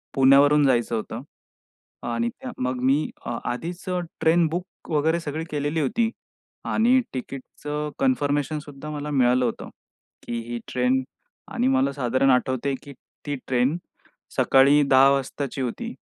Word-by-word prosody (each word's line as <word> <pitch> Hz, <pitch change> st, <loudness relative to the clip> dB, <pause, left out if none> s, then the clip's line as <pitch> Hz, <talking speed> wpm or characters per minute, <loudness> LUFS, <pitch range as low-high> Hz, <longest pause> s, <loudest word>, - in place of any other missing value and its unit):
पुण्यावरून 140 Hz, +2 st, +6 dB
जायचं 120 Hz, -3 st, +2 dB
होतं. 110 Hz, +1 st, -4 dB, 0.9 s
आणि 115 Hz, 0 st, 0 dB
त्या 255 Hz, -, -8 dB
मग 125 Hz, 0 st, -2 dB
मी 135 Hz, +4 st, +2 dB, 0.2 s
अ, 120 Hz, -, -3 dB
आधीच 175 Hz, +10 st, -6 dB
अ, 180 Hz, 0 st, 0 dB, 0.2 s
ट्रेन 165 Hz, +1 st, +4 dB
बुक 175 Hz, +3 st, -7 dB
वगैरे 160 Hz, +2 st, +2 dB
सगळी 155 Hz, 0 st, -4 dB
केलेली 145 Hz, +2 st, -1 dB
होती. 225 Hz, -, +1 dB, 0.6 s
आणि 245 Hz, +4 st, +3 dB
तिकीटच 135 Hz, +2 st, -8 dB, 0.3 s
कन्फर्मेशन 150 Hz, -, +1 dB
सुद्धा 145 Hz, 0 st, -10 dB
मला 150 Hz, 0 st, -5 dB
मिळालं 125 Hz, -2 st, +3 dB
होतं. 115 Hz, -, -4 dB, 0.5 s
की 120 Hz, 0 st, -4 dB
ही 120 Hz, -, -3 dB
ट्रेन 130 Hz, +1 st, +1 dB, 0.5 s
आणि 125 Hz, -, +1 dB
मला 135 Hz, +1 st, +2 dB
साधारण 130 Hz, 0 st, +1 dB
आठवतंय 130 Hz, +1 st, +1 dB
की 140 Hz, -, -10 dB, 0.3 s
ती 145 Hz, -1 st, -2 dB
ट्रेन 130 Hz, +5 st, +1 dB, 0.6 s
सकाळी 140 Hz, +2 st, +5 dB
10 135 Hz, +1 st, +7 dB
वाजताची 140 Hz, 0 st, -2 dB
होती. 230 Hz, -, -4 dB
140 Hz, 140 wpm, -24 LUFS, 130-155 Hz, 0.9 s, 10